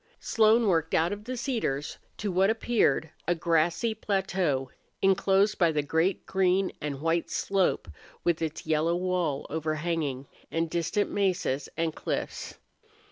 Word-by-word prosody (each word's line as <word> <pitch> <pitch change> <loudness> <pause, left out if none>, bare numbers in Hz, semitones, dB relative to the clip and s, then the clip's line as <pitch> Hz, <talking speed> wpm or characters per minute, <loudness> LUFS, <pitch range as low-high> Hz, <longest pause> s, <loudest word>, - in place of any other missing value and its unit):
Slone 225 +1 +4
worked 165 -4 +2
out 165 +4 +2
of 205 +1 -8
the 255 +1 -4
cedars 225 - -2 0.2
to 205 -1 -2
what 190 +2 +3
appeared 220 - +1 0.2
a 175 - +2
grassy 170 +6 +1
plateau 185 -10 -1 0.3
inclosed 195 +2 +3
by 170 -3 +4
the 150 -2 0
great 160 +6 0
green 190 0 +2
and 145 -2 -4
white 165 +1 0
slope 195 - 0 0.4
with 170 -1 +1
its 160 -1 -3
yellow 160 +2 +1
wall 175 -5 -1
overhanging, 155 -3 -2 0.2
and 165 0 -1
distant 175 +5 0
mesas 180 -9 0
and 165 -1 0
cliffs. - - -4
170 Hz, 135 wpm, -28 LUFS, 160-195 Hz, 0.4 s, Slone